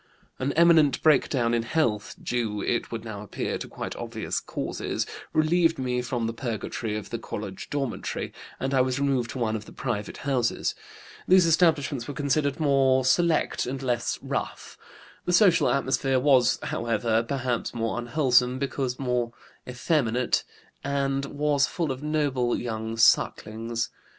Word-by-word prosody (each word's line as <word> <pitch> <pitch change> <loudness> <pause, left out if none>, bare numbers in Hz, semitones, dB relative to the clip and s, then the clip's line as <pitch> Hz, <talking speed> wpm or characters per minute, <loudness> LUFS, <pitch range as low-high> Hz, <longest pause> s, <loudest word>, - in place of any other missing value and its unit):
"An 130 +2 0
imminent 165 -4 +5
breakdown 130 -5 +3
in 120 - +2
health 115 -5 -1
due, 115 -4 -2
it 120 +3 -1
would 115 -1 -5
now 105 -3 -6
appear, 105 - -4
to - - -6
quite - - -6
obvious - - -3
causes - - -3 0.3
relieved 165 +1 +3
me 125 -1 -1
from 120 -1 -2
the 115 - -2
purgatory 115 -2 -3
of 105 - -8
the 115 - -3
college 105 -3 -6
dormitory, 135 -5 -3 0.3
and 135 +1 -2
I 130 - +4
was 130 +1 0
removed 135 -4 +1
to - - -6
one 110 -3 0
of 105 -1 -5
the - - -13
private 105 -5 -4
houses. 130 -4 0 0.5
These 185 -1 +6
establishments 155 -7 +2
were 145 - -6
considered 140 0 0
more 135 -3 +3
select 160 +2 +2
and 135 +2 -3
less 120 -2 -1
'rough.' - - -4 0.5
The 180 - 0
social 175 - +5
atmosphere 135 0 +1
was, 130 -3 +4
however, 115 -1 0
perhaps 125 -1 -2
more 115 0 -1
unwholesome, 125 -1 +2
because 130 -2 -2
more 125 -3 -1 0.4
effeminate, 125 -2 +1 0.4
and 140 -1 0
was 145 0 +1
full 165 -5 -2
of 130 +1 -5
noble 145 -5 0
young 110 -1 -4
sucklings. 115 0 +2
130 Hz, 150 wpm, -26 LUFS, 115-140 Hz, 0.5 s, These